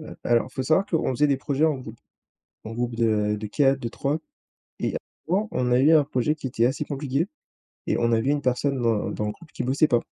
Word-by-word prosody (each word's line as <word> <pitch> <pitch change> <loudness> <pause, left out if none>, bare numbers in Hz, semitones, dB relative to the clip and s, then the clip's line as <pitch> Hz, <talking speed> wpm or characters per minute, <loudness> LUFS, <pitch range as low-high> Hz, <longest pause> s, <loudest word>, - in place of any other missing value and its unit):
heu, 155 - -9
alors, 120 +2 +2
faut 130 - -2
savoir 160 +8 +2
qu'on 160 -5 0
faisait 145 +4 +2
des 140 -2 +2
projets 140 +2 0
en 155 -2 +3
groupe 120 -3 -10 0.7
en 110 - -6
groupe 120 0 -2
de 105 -2 +1
de 105 - -5
4 135 +4 +2
de 120 - -3
3 140 +6 -1 0.6
et - - -2 0.3
avant, 200 +5 +1
on 125 -1 0
a 125 - +5
eu 150 +4 +5
un 150 -3 +6
projet 145 +1 0
qui 145 - -7
était 120 -1 +1
assez 145 +4 -1
compliqué 140 +2 -1 0.6
et - - +1
on 120 0 +2
avait 115 +5 +2
1 145 - +1
personne 130 +1 0
dans 115 -3 +1
dans 105 - -3
le 105 - -2
groupe 170 0 -17
qui 125 - -4
bossait 140 +5 +3
pas. 120 -2 +3
130 Hz, 235 wpm, -25 LUFS, 120-150 Hz, 0.7 s, un